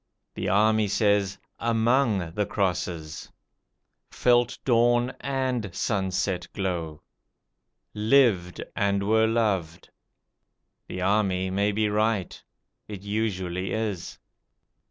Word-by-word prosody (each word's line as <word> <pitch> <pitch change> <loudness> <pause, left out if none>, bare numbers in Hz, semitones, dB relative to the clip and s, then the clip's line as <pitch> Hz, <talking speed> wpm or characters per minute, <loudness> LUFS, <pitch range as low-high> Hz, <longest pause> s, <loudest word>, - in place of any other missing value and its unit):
The 95 - -3
army 110 +2 +3
says, 100 -1 +1 0.2
"AMONG 115 -5 +1
the 105 +2 -1
crosses"; 90 -6 -3 0.8
"felt 120 -1 +2
dawn 120 0 +3
AND 130 -8 -2
sunset 95 -3 -1
glow"; 85 -6 -3 0.9
"LIVED 105 -5 +2
and 100 -1 +1
were 110 +1 +4
loved". 100 -8 -1 1.0
The 90 - -5
army 95 -1 +1
may 100 +2 +1
be 105 +1 +1
right: 105 -2 -1 0.4
it 100 -2 -8
usually 95 -3 -2
is. 105 -5 -3
105 Hz, 95 wpm, -26 LUFS, 95-110 Hz, 1.0 s, were